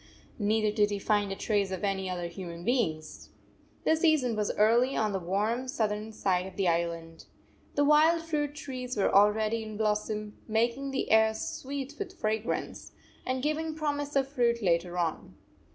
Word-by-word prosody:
Neither 215 0 +2
did 210 -2 +3
he 205 - -2
find 205 0 +1
a - - -2
trace 205 -1 0
of 190 0 -5
any 195 -2 -1
other 180 -1 -3
human 170 -1 -7
beings. 165 -11 -1 0.5
The 320 - +4
season 310 -8 +2
was 210 -1 -1
early 235 +5 +3
on 215 -2 +1
the 190 - -1
warm 210 +8 -1
south 230 -6 0
ern 210 +1 -5
side 185 -3 0
of 190 - -11
the 195 -1 0
island. 165 -1 -2 0.5
The 290 - +3
wild 315 +3 +5
fruit 295 -3 -2
trees 255 -5 -5
were 200 - +2
already 215 +3 +4
in 215 -1 -7
blossom, 210 0 -2
making 235 +5 0
the 270 - -2
air 220 0 +5
sweet 275 +4 -5
with 380 -2 -6
fragrance, 220 +2 -3 0.3
and 255 0 -1
giving 310 +1 -1
promise 290 -2 -2
of 270 -1 +2
fruit 235 -4 +1
later 175 0 +1
on. 165 - -2
220 Hz, 170 wpm, -29 LUFS, 195-265 Hz, 0.5 s, wild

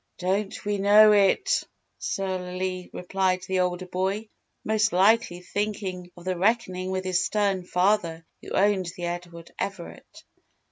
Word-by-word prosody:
"Don't 195 +4 -2
we 205 -1 -1
know 210 +2 +7
it," 205 - +3 0.4
surlily 185 -1 -3
replied 185 0 -1
the 190 0 0
older 180 0 -1
boy, 190 +4 -2 0.4
most 215 0 +2
likely 190 -1 +3
thinking 195 -2 -3
of 175 - -13
the 185 0 -1
reckoning 185 -3 0
with 185 0 -2
his 185 -1 +1
stern 200 -3 0
father 180 -3 +1 0.2
who - - -10
owned 195 -2 +2
the 175 - -4
Edward 175 -1 -6
Everett. 200 - -7
185 Hz, 135 wpm, -26 LUFS, 180-205 Hz, 0.4 s, know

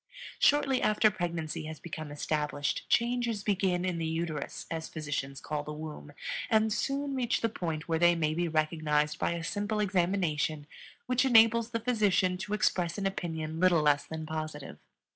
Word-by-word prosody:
Shortly 275 -3 +3
after 215 0 +4
pregnancy 170 -5 -3
has 155 -1 -7
become 155 -2 -7
established 150 -1 -2
changes 235 -3 +1
begin 190 -3 +1
in 180 -2 -1
the 165 - -1
uterus, 160 -2 -3
as 160 -1 -4
physicians 145 -3 -4
call 150 -1 -3
the 150 +1 -6
womb, 150 -1 -8 0.4
and 220 -1 +3
soon 275 +4 -1
reach 250 -3 0
the 230 - +1
point 165 -7 -4
where 165 -1 0
they 175 0 +5
may 155 -2 0
be 175 +2 0
recognized 155 -1 0
by - - +1
a 170 -1 -4
simple 205 +4 -2
examination 175 -6 0 0.4
which 250 0 +2
enables 230 -2 +5
the 230 -1 -2
physician 205 -6 +2
to 205 +2 -4
express 180 -5 +1
an 200 - -2
opinion 160 -4 -3
little 175 -3 +4
less 145 -1 +3
than 160 0 -6
positive. 155 - -5
170 Hz, 165 wpm, -30 LUFS, 155-210 Hz, 0.4 s, they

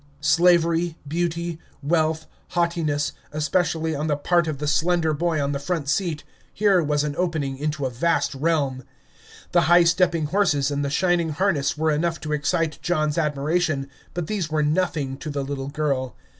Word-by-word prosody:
Slavery, 170 +1 +3
beauty, 170 +1 -2 0.2
wealth, 160 +1 +1 0.3
haughtiness, 160 -4 0 0.2
especially 160 +1 0
on 150 +1 -2
the 145 -2 +1
part 170 +2 +2
of 155 -3 -2
the 150 - -4
slender 160 +2 +2
boy 165 +1 0
on 140 0 0
the 140 - -2
front 160 -1 -2
seat, 160 -2 -1 0.3
here 200 -3 +3
was 145 -1 +1
an 150 -1 -3
opening 160 -7 -1
into 150 -1 -2
a 130 - -2
vast 165 +6 +1
realm. 140 -3 0 0.7
The - - +4
high 175 0 +7
stepping 170 -1 +2
horses 150 -6 +1
and 145 0 -1
the 140 - -1
shining 170 +2 +1
harness 155 -3 0
were 160 0 +1
enough 165 +2 0
to 150 -1 -3
excite 150 +1 -1
John's 155 -2 0
admiration, 150 -1 0 0.2
but 175 -2 -2
these 185 -3 -2
were 155 -1 +1
nothing 150 -4 0
to 150 - -6
the 140 -1 -2
little 135 -1 -4
girl. 140 -4 -2
155 Hz, 170 wpm, -23 LUFS, 145-170 Hz, 0.7 s, high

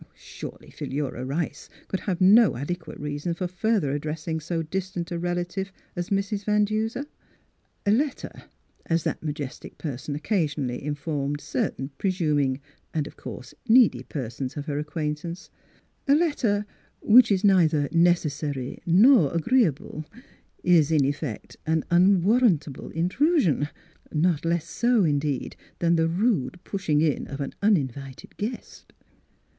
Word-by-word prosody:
Surely - - -10
Philura 135 -3 -4
Rice 145 +2 -3 0.2
could 190 - -2
have 185 -4 -2
no 200 - +6
ade 160 +7 -3
quate 160 -2 -11
reason 150 +3 -3
for 180 - -3
further 185 -4 0
addressing 155 +2 -3
so 165 +1 -2
distant 180 +1 -4
a 170 - -2
relative 175 +3 -2 0.2
as 175 -1 -3
Mrs. 200 +1 -1
Van 210 0 +3
Duser. 220 +6 -2 0.8
"A 200 - +3
letter," 270 +5 0 0.6
as 165 -1 +1
that - - -2
majestic 145 -3 -6
person 140 -1 -5
oc 150 - -7
casionally 150 - -1
informed 145 0 -2
certain 135 -1 -3
presuming 150 -8 +1 0.4
(and 155 -2 0
of - - -10
course 125 +1 -9
needy) 220 - +5
persons 130 0 -5
of 145 - -4
her 145 -2 -2
ac 150 0 -5
quaintance 160 +3 -4 0.3
— - - -41
"a - - +7
letter, 245 -11 +1 0.4
which 240 +1 +7
is 195 0 +2
neither 165 -7 +4
necessary 150 -6 +1
nor 195 - +6
agreeable, 170 - +1 0.6
is, 165 -4 +4
in 150 -4 +4
effect, 140 -4 -4
an 160 0 +2
unwarrantable 185 - +3
intrusion; 180 - +2 0.4
not 165 0 +1
less 170 -1 0
so, 240 +2 +2
in 145 -4 +2
deed, 140 -3 -3 0.2
than 170 0 +2
the 165 0 +2
rude 180 - 0
pushing 160 -7 0
in 155 -3 0
of 140 - -7
an 140 - -4
unin 200 -10 +3
vited 135 0 -11
guest." 230 +4 -6
165 Hz, 140 wpm, -25 LUFS, 145-195 Hz, 0.8 s, a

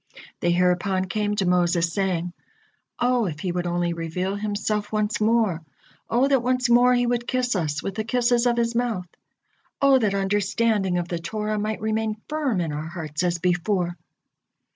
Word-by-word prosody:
They 175 - 0
hereupon 180 +2 +1
came 210 +2 -1
to 195 - 0
Moses, 175 -2 +2
saying: 180 -3 -1 0.7
"O, 245 -3 +2
if 155 -2 -5
He 180 - -1
would 175 0 -2
only 175 0 0
reveal 170 +4 -3
Himself 210 0 -2
once 215 0 -1
more! 215 -6 +2 0.5
O 245 +4 +3
that 270 -3 +3
once 250 0 +1
more 245 +1 +6
He 245 0 +2
would 240 0 -1
kiss 250 -3 0
us 160 -4 -1
with 195 - -3
the 220 - -2
kisses 240 +1 +2
of 240 -1 +1
His 235 0 +1
mouth! 230 -6 -1 0.7
O 275 -1 +5
that 210 -4 +1
understanding 200 0 +1
of 175 -1 -2
the 170 -1 -3
Torah 210 +4 -3
might 215 0 -3
remain 220 0 -1
firm 290 -11 -1
in 160 -3 -2
our 150 +2 -4
hearts 160 -3 -5
as 175 -1 +1
before!" 175 0 0
205 Hz, 175 wpm, -24 LUFS, 175-235 Hz, 0.7 s, more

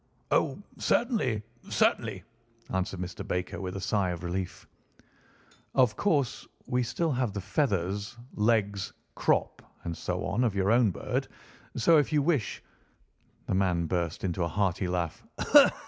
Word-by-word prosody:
"Oh, - - +2 0.2
certainly, 210 - +1 0.3
certainly," - - +1 0.5
answered 95 0 -1
Mr. 90 +3 -5
Baker 90 -1 -2
with 95 0 -4
a - - -3
sigh 100 -1 +1
of 85 0 -4
relief. 90 +1 -4 1.1
"Of 125 -5 +4
course, 145 - 0 0.2
we 125 0 +1
still 130 +7 0
have 125 -5 0
the 100 - -3
feathers, 100 - -1 0.2
legs, 105 -3 +1 0.2
crop, - - +1 0.2
and 85 - -3
so - - -3
on 105 +6 +1
of 115 -5 +1
your 100 +1 +2
own 120 -2 +5
bird, 90 - -2 0.5
so 155 +7 +5
if 145 - 0
you 150 -2 +3
wish—" 145 -8 0 0.8
The - - -1
man 90 -3 +2
burst 85 -1 -2
into 90 -1 0
a - - +1
hearty 95 +1 0
laugh. 90 -2 -2
100 Hz, 145 wpm, -29 LUFS, 90-125 Hz, 1.1 s, own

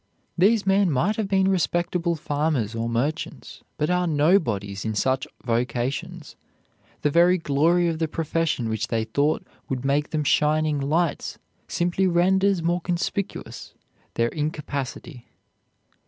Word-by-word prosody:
These 200 +4 +3
men 195 -1 +3
might 170 +9 +1
have 220 -3 -1
been 190 -1 +2
respectable 175 -2 0
farmers 145 -7 -1
or 115 0 -2
merchants, 140 +8 -3 0.2
but 150 +3 0
are 180 0 +1
"nobodies" 145 - +1
in 110 -1 -2
such 130 +4 0 0.2
vocations. 130 +8 -2 0.7
The 150 - +2
very 175 +3 +5
glory 165 +3 +2
of 165 -1 -2
the 160 - +1
profession 160 -5 -1
which 110 -1 -2
they 115 -1 0
thought 140 +7 0 0.2
would 130 0 -3
make 145 +2 +1
them 155 -1 -1
shining 150 +1 +2
lights 155 +4 -1 0.3
simply 180 +2 0
renders 190 +1 +2
more 175 +1 +1
conspicuous 180 +3 -4 0.4
their 115 0 +1
incapacity. 145 -3 -5
155 Hz, 130 wpm, -24 LUFS, 135-175 Hz, 0.7 s, very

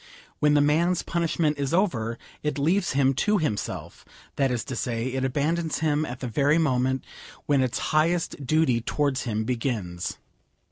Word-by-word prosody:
When 150 0 +4
the 145 - +5
man's 165 +5 +2
punishment 165 -3 0
is 140 +3 0
over, 115 - 0 0.2
it 150 -1 -2
leaves 175 +5 +1
him 135 0 +3
to 210 +10 +2
himself; 130 - -3 0.3
that 135 -1 +2
is 120 -3 -1
to 130 - -5
say, 120 0 -2
it 130 0 -1
abandons 155 +5 0
him 155 -1 +1
at 125 -2 -7
the 130 - -3
very 145 +6 +2
moment 130 -4 +1 0.4
when 140 -2 +3
its 130 -2 0 0.2
highest 165 -1 +1
duty 135 -4 +2
towards 140 +2 -1
him 110 -2 -1
begins. 110 -8 -3
140 Hz, 160 wpm, -26 LUFS, 125-155 Hz, 0.4 s, the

